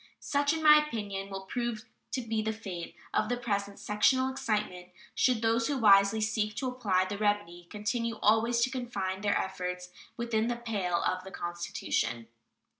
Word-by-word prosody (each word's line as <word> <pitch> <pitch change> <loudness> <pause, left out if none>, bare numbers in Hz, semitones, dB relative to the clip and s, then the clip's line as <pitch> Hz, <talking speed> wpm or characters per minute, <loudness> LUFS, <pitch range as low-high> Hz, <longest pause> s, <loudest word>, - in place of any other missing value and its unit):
Such, 285 0 +1
in 320 0 -2
my 300 0 +8
opinion, 205 -8 -4
will 195 -1 -6
prove 235 0 -3 0.3
to 255 - 0
be 225 -1 -1
the 220 0 -1
fate 190 -6 -7 0.2
of 215 - +1
the 245 - 0
present 200 -4 -2
sectional 260 +6 +2
excitement 210 -8 -2 0.2
should 245 -3 +2
those 230 0 +2
who 285 - 0
wisely 200 -2 +6
seek 215 0 0
to 255 +4 -2
apply 210 -8 +1
the 200 +2 -5
remedy 205 -5 -1
continue 230 +3 -2
always 230 +2 +3
to 255 +2 +2
confine 200 -7 -3
their 205 -1 +2
efforts 180 -1 -4 0.3
within 235 -2 0
the 240 - 0
pale 205 -7 -1
of 185 0 -1
the 190 - -9
Constitution. 145 -10 -3
215 Hz, 170 wpm, -30 LUFS, 195-235 Hz, 0.3 s, my